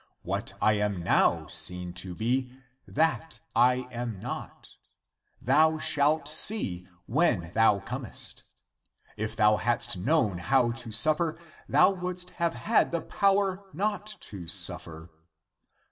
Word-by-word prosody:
What - - -3
I 110 - +3
am 105 -3 -1
now - - +2
seen 90 +2 -1
to 90 -2 -8
be, 125 +4 -1 0.4
that 160 +1 -1 0.2
I 125 0 +3
am 120 -4 -5
not. - - -8 0.7
Thou 160 0 +3
shalt 150 0 +1
see, 150 - +2 0.2
when 115 - +1
thou 110 -3 +3
comest. 125 0 -1 0.7
If 110 +1 -4
thou 105 -1 +4
hadst 120 -3 0
known 105 - +1
how 125 +5 +2
to 115 -1 -6
suffer, 155 +9 +3 0.3
thou 185 - +5
wouldst 180 -1 -5
have 170 -1 +1
had 225 - +1
(the 170 -1 -1
power) 195 0 +1
not 205 +3 -2
to 90 -5 -9
suffer. 80 0 -3
125 Hz, 125 wpm, -27 LUFS, 105-160 Hz, 0.7 s, thou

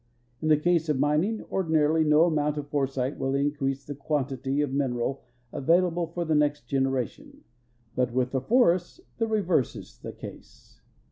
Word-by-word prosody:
In 155 - -1
the 155 -1 +5
case 165 0 +1
of 150 - +2
mining, 155 +10 +1
ordinarily 160 -3 +2
no 150 +1 +5
amount 150 -3 +1
of 145 -1 -5
foresight 135 -2 -1
will 135 +1 0
increase 140 -1 -1
the 145 - -5
quantitA^ 140 -1 -1
of 140 -2 -3
mineral 135 -1 -1 0.3
avail 170 +6 +3
able 170 0 -2
for 170 +1 -4
the 160 - 0
next 145 -3 +1
generation, 135 -3 -2 0.5
but 125 -1 +1
with 125 0 0
the 130 - -1
forests 185 - +2 0.2
the 225 - +1
reverse 185 - +1
is - - -11
the - - -7
case. - - -13
145 Hz, 165 wpm, -27 LUFS, 135-165 Hz, 0.5 s, the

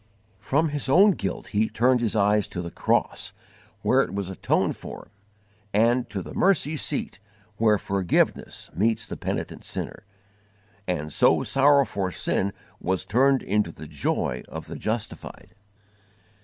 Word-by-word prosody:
From 145 +10 +1
his 145 -2 -2
own 195 +9 +7
guilt 100 - -4
he 110 +1 +1
turned 125 +2 +2
his 115 -2 0
eyes 105 -1 +3
to 90 - -5
the 85 - -6
cross - - 0 0.5
where - - +4
it 95 - -3
was 100 -2 -3
atoned 95 - 0
for, - - -10 0.7
and 120 +3 +3
to 95 -3 -4
the - - -9
mercy 180 -5 +2
seat 145 -8 -1 0.4
where 110 -2 +4
forgiveness 95 -2 -1
meets 110 +4 +1
the - - -6
penitent - - -4
sinner; - - -5 0.8
and 75 -4 -2
so - - +4
sorrow 140 0 +4
for 95 -4 -2
sin 95 +3 0 0.3
was 95 0 -1
turned 135 +4 +3
into 105 -3 0
the 80 - -10
joy 70 -4 -1
of - - -7
the - - -8
justified. 110 0 -5
105 Hz, 145 wpm, -25 LUFS, 95-130 Hz, 0.8 s, own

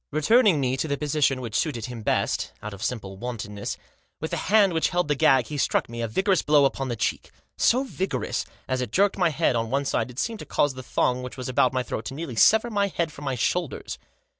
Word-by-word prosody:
Returning 180 - +4
me 130 -1 0
to 155 - -1
the 140 -1 -1
posi 150 0 -1
tion 135 -1 +2
which 115 -4 -6
suited 120 -7 -1
him 120 -2 -7
best, - - -1
out 105 0 -5
of 100 - -10
simple 100 -6 -4
wantonness, 105 -3 -5 0.4
with 160 - -4
the - - -1
hand 200 -3 +5
which 160 - +1
held 175 -2 0
the 145 - +2
gag 135 -2 +4
he 150 +2 -5
struck - - +1
me 115 0 -6
a 115 - -1
vigorous 190 - +1
blow 150 -2 +4
upon 135 0 -1
the 120 - -2
cheek; 105 - -2 0.3
so 255 +3 +3
vigorous 195 -7 -2
that, - - -24 0.2
as 130 0 -1
it 125 -4 -4
jerked 200 - +2
my 175 -2 +4
head 135 -4 +1
on 115 -1 -1
one 140 +3 0
side - - 0
it 125 - -12
seemed 225 +6 -2
to - - -8
cause 145 -2 +1
the 130 - -8
thong 125 0 0
which 125 +1 -8
was 130 - -5
about 130 0 +3
my 130 -1 -1
throat 110 - -5
to 135 - -5
nearly 150 -5 -5
sever 220 - +5
my 200 -1 +1
head 170 -4 -2
from 145 +1 -10
my 135 -1 -1
shoulders. 160 +6 -2
135 Hz, 250 wpm, -25 LUFS, 125-170 Hz, 0.4 s, hand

